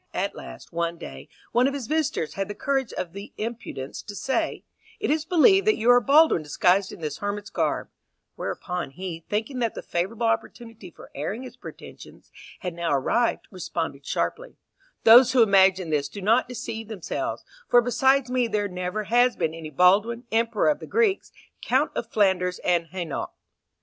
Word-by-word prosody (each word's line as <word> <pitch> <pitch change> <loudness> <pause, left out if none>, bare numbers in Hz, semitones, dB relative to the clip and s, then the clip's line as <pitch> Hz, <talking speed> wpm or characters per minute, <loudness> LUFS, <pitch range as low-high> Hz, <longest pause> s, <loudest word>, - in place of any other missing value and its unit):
At - - -1
last, - - -11
one 170 0 -2
day, 65 - -10 0.2
one 245 +2 +3
of 275 - -2
his 275 -4 -4
visitors 310 - -1
had 195 -1 -3
the 205 - -6
courage 270 -3 -1
or - - 0
the 195 +4 -11
impudence 215 - -6
to 205 - -9
say, 265 +6 -2 0.4
"It 425 - 0
is 310 0 0
believed 385 +4 +4
that 430 - +4
you 235 +3 +4
are 245 0 +6
Baldwin 290 - +5
disguised 180 +6 +2
in - - -11
this 150 -2 -4
hermit's 205 +1 -4
garb;" - - -1 0.5
whereupon 180 -4 -4
he, 170 +2 -7
thinking 225 +5 -2
that 230 -2 -1
the - - -6
favourable 200 +7 -2
opportunity 225 -2 -3
for - - -15
airing 195 - -4
his 250 -1 -10
pretensions 250 - -12 0.3
had 180 -4 -4
now 170 -1 -2
arrived, 185 - +1
responded 165 -6 -4
sharply, - - -3 0.5
"Those 245 +3 +8
who 250 -3 +6
imagine 190 -4 +4
this 145 -2 0
do 175 - -9
not 225 +6 +2
deceive 225 -3 -6
themselves, 210 -6 -4 0.2
for 245 - +7
besides 250 +2 +2
me 250 -2 +1
there 210 -2 -1
never 180 +3 -4
has 245 +4 +3
been 160 -2 -1
any 165 -1 -7
Baldwin, 200 - +3
Emperor 225 +1 +2
of 300 - 0
the - - -9
Greeks, 445 -4 +1 0.3
Count - - +1
of - - -4
Flanders 185 -3 +2
and 170 -2 +1
Hainault." 175 -1 -4
210 Hz, 175 wpm, -25 LUFS, 180-245 Hz, 0.5 s, Those